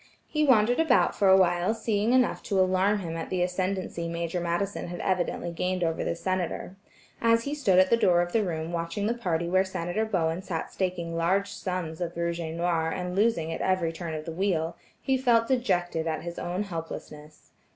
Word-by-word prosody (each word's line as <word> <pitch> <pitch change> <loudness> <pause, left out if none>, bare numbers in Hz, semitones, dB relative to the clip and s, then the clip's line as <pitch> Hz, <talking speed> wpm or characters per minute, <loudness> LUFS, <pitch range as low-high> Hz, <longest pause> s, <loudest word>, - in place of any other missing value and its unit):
He 305 -1 0
wandered 245 -3 +4
about 320 -6 +4
for 200 - +2
a 190 - +8
while 180 +3 +2
seeing 220 0 0
enough 255 0 +3
to 195 -3 +2
alarm 190 +2 +2
him 165 -2 -5
at 165 - -5
the 180 -1 0
ascendency 185 -2 -2
Major 170 +1 -2
Madison 175 +4 -2
had 175 0 -6
evidently 180 -2 -1
gained 180 +1 -1
over 165 -1 0
the - - -1
Senator. 185 +1 -3 0.5
As 230 0 +4
he 285 - -3
stood 205 -11 +2
at 185 0 +5
the 235 - +6
door 180 -6 +4
of 175 - -6
the 220 +1 +2
room 165 -3 -3
watching 170 +4 -2
the 225 - +1
party 170 -8 -1
where 185 +2 +3
Senator 190 +2 -2
Bowen 170 -4 0
sat 175 -4 -4
staking 180 -3 -2
large 190 +4 +1
sums 180 -5 -4
of 170 -1 -3
rouge 170 0 -1
et 160 -1 -4
noir 170 -1 0
and 180 +1 -3
losing 190 -6 +1
at - - -5
every 180 -3 +1
turn 165 -1 -5
of 155 0 -6
the 165 - -5
wheel, 170 -2 -1 0.2
he 265 -1 0
felt 235 -3 +3
dejected 175 -10 0
at 160 -1 -2
his 170 0 -6
own 180 +4 -2
helplessness. 160 -4 -8
180 Hz, 205 wpm, -27 LUFS, 170-200 Hz, 0.5 s, a